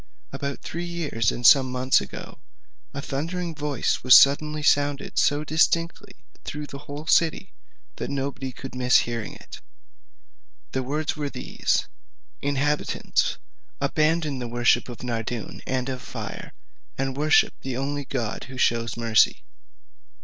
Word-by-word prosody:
"About 140 -1 -4
three 170 +1 -5
years 165 -11 -1
and 120 - -5
some 130 -1 +7
months 130 - +3
ago, 65 - -9 0.5
a 140 - -6
thundering 165 +5 -3
voice 145 -3 -1
was 130 +1 +9
suddenly 150 +2 +2
sounded 145 -1 +1
so 145 +1 +2
distinctly, 170 +6 0 0.3
through 150 0 -5
the 140 -1 -9
whole 145 +1 -8
city, 160 0 +2 0.4
that - - -4
nobody 135 -1 -3
could 130 +1 -9
miss 125 -1 +4
hearing 115 -2 -4
it. - - -12 1.1
The 130 - -1
words 150 +4 -2
were 145 -2 -3
these: - - -1 0.5
'Inhabitants, 145 +1 0 0.4
abandon 155 -3 +1
the 120 - -4
worship 120 +1 +2
of 120 +1 -9
Nardoun, 115 -2 -4
and 130 0 -1
of 130 -1 -4
fire, - - -7 0.5
and 135 0 -2
worship 150 +2 +4
the 130 -2 -4
only 140 +1 -3
God 120 -5 -3
who 130 0 -10
shews 115 -2 +1
mercy.' 115 -3 +3
140 Hz, 135 wpm, -25 LUFS, 125-150 Hz, 1.1 s, was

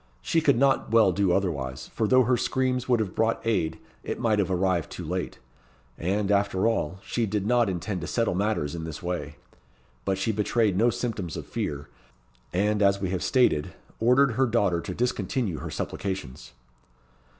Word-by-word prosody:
She 165 - +2
could 140 -5 +3
not 135 +1 +2
well 110 -4 +5
do 95 0 +1
otherwise; 70 -9 -2
for 110 - -1
though 130 +3 +5
her 125 +2 +2
screams 130 0 -1
would 120 -2 +4
have 105 -4 -2
brought 115 +1 +1
aid, 80 -8 0 0.3
it - - -4
might 110 -2 +2
have 100 - +1
arrived 90 -3 0
too - - -6
late. - - -3 0.6
And, 100 +6 -1
after 100 -1 +1
all, 95 -6 -1
she 115 -2 -1
did 100 -1 -1
not 120 -1 +3
intend 95 +1 -3
to 80 - -5
settle 115 -5 0
matters 95 -6 -1
in 85 -1 -5
this 80 0 -7
way. 90 0 -3 0.7
But 95 -1 0
she 95 +4 0
betrayed 105 -1 +1
no 115 +5 +4
symptoms 110 -8 -3
of - - -6
fear, 70 +1 -4 0.6
and, 105 +3 +1
as 100 -1 +4
we 95 -2 -2
have 95 - -2
stated, 125 - +2 0.2
ordered 125 +4 +4
her 130 +3 +2
daughter 100 -7 +1
to 90 - -6
discontinue 115 - -1
her - - -6
supplications. 95 -11 -5
100 Hz, 180 wpm, -26 LUFS, 90-115 Hz, 0.7 s, well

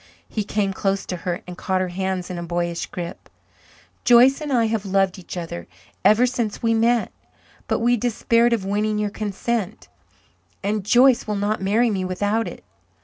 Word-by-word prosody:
He 215 - -3
came 200 -1 -1
close 195 0 -1
to 180 - -4
her 175 +1 -4
and 180 - -8
caught 190 -2 0
her 185 -1 -1
hands 185 0 -3
in 175 - -4
a - - -5
boyish 170 0 -2
grip. 175 -1 -7 0.7
"Joyce 250 +4 +6
and 300 -2 -4
I 235 -3 +3
have 220 -2 -1
loved 195 -1 +1
each 180 - -8
other 165 - -6 0.4
ever 220 +4 +5
since 240 -4 -2
we 230 0 +3
met. 230 +1 +2 0.6
But - - 0
we 240 +1 +3
despaired 235 +1 +2
of 225 -5 0
winning 210 +2 0
your 210 -1 -1
consent, 215 0 -3 0.7
and 205 0 -1
Joyce 245 +4 +4
will 210 - -1
not 205 +1 -1
marry 220 +5 +2
me 190 -2 -1
without 205 +5 -1
it. - - -9
205 Hz, 180 wpm, -22 LUFS, 185-230 Hz, 0.7 s, Joyce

